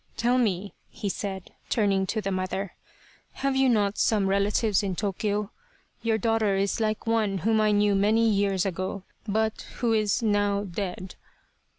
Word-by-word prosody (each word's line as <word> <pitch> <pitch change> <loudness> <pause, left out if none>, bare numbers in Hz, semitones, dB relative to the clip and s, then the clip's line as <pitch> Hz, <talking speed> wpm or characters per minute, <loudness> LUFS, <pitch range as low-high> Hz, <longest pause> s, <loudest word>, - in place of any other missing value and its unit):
" - - -34
Tell 245 +2 +2
me," 200 -4 -1 0.2
he 205 - -4
said, 190 -2 -5 0.2
turning 195 -4 +1
to 220 - -1
the 195 -1 -2
mother, 185 0 -3 0.3
" - - -30
have 275 -1 +1
you 265 -1 +4
not 205 -3 +1
some 210 -3 +2
relatives 200 +1 +2
in 195 -3 -2
Tokyo? 205 +1 -2 0.5
Your 225 -1 +1
daughter 220 -2 +1
is 195 +2 0
like 215 -1 -1
one 220 -4 +1
whom 220 -1 +3
I 215 - +3
knew 205 0 +3
many 215 +3 +3
years 200 -3 +1
ago, 185 +1 -3 0.2
but 220 +1 0
who 235 -2 +1
is 215 +2 +1
now 205 -1 +1
dead." 185 -1 -5
205 Hz, 170 wpm, -26 LUFS, 195-220 Hz, 0.5 s, you